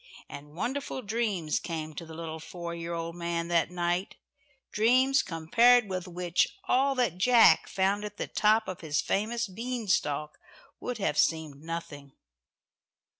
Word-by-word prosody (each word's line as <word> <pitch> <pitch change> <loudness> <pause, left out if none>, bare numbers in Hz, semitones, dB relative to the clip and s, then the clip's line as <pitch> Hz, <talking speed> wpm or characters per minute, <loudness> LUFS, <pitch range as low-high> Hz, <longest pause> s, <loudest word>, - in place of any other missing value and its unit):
And 145 +1 -11
wonderful 260 +6 -3
dreams 205 -7 -1
came 155 -2 -5
to 165 +3 -8
the 160 - -10
little 160 -1 -6
four 170 +2 -7
year 170 0 -5
old 165 0 -4
man 170 -1 -3
that 170 -2 +2
night 175 +1 -2 0.6
dreams 255 +5 +4
compared 230 +9 +4
with 185 -1 -4
which, 175 - 0
all 270 -1 +2
that 230 -9 0
Jack 240 +3 +6
found 195 +2 0
at 210 0 -7
the - - -2
top 215 +1 +2
of 185 - -6
his 155 -2 -1
famous 230 +7 -1
bean 230 +3 -5
stalk 150 -4 -1 0.4
would 250 -2 -4
have 195 -8 -1
seemed 155 -3 0
nothing. 150 -4 -7
180 Hz, 150 wpm, -29 LUFS, 165-225 Hz, 0.6 s, Jack